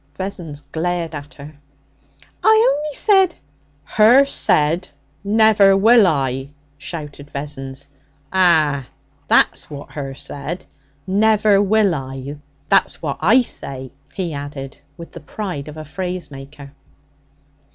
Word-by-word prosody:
Vessons 175 -6 -6
glared 165 +3 -3
at 145 0 -8
her. 145 0 -12 0.8
'I 440 +2 +5
only 295 -1 -4
said 385 -4 +3 0.3
' 145 0 -38
'Her 235 - +5
said, 170 - +1 0.3
"Never 205 -2 +5
will 225 +1 +6
I!"' 135 -3 -1 0.3
shouted 150 -2 -7
Vessons. 140 -1 -6 0.5
'Ah, 155 -7 +3 0.4
that's - - +3
what 145 -1 -9
her 135 -2 -6
said 145 +6 -6 0.4
"Never 210 0 +3
will 205 -1 +3
I!" 135 0 -6 0.3
That's 195 - +2
what 145 -3 -3
I 225 +10 +5
say,' 130 - -7 0.2
he 175 -4 -4
added 140 -1 -7 0.2
with 170 - -10
the 170 - -10
pride 155 -1 -6
of 150 +1 -9
a 155 - -7
phrase 180 +1 -5
maker. 140 +1 -11
155 Hz, 120 wpm, -19 LUFS, 140-200 Hz, 0.8 s, will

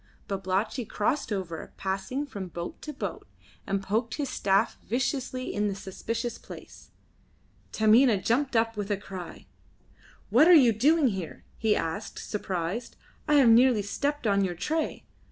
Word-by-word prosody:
Babalatchi 195 +5 -1
crossed 225 +4 -1
over, 180 -5 -4
passing 195 +9 -2
from 200 -9 -6
boat 170 0 -7
to 305 - -6
boat, 205 - -6 0.4
and 195 0 -1
poked 225 +4 -1
his 285 -3 -3
staff 195 0 +1
viciously 255 +1 -2
in 210 0 0
the 200 - -2
suspicious 230 +5 -4
place. - - -12 0.8
Taminah 220 +1 +5
jumped 260 +2 +1
up 225 0 +2
with 205 -1 -4
a 205 - +1
cry. 190 -3 -9 0.9
"What 260 +9 +6
are 355 - +9
you 250 -7 +6
doing 285 +5 +4
here?" 190 -6 -6
he 220 -2 +2
asked, 165 +7 -3
surprised. 195 +2 -4 0.3
"I 300 - +4
have 270 -5 +6
nearly 235 -2 +5
stepped 285 +7 -2
on 200 -2 +3
your 180 -2 -2
tray. 310 - -2
220 Hz, 150 wpm, -27 LUFS, 195-255 Hz, 0.9 s, are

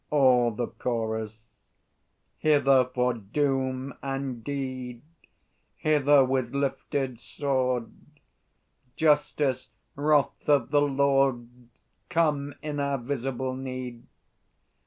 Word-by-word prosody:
All 130 -5 +4
the 120 +2 -3
Chorus. 110 -1 -4 0.9
Hither, 140 -4 +4
for 125 0 0
doom 130 +3 -1
and 135 -3 -4
deed! 130 -3 -5 0.7
Hither 145 -2 +4
with 130 -1 -1
lifted 135 -2 -2
sword, 130 -3 -1 1.0
Justice, 145 -5 +1 0.3
Wrath 145 0 +1
of 140 -3 +3
the 145 -1 +4
Lord, 135 -3 +2 0.6
Come 150 -4 +1
in 150 -1 -3
our 140 -1 0
visible 130 0 -3
need! 130 -2 -6
135 Hz, 90 wpm, -27 LUFS, 125-140 Hz, 1.0 s, All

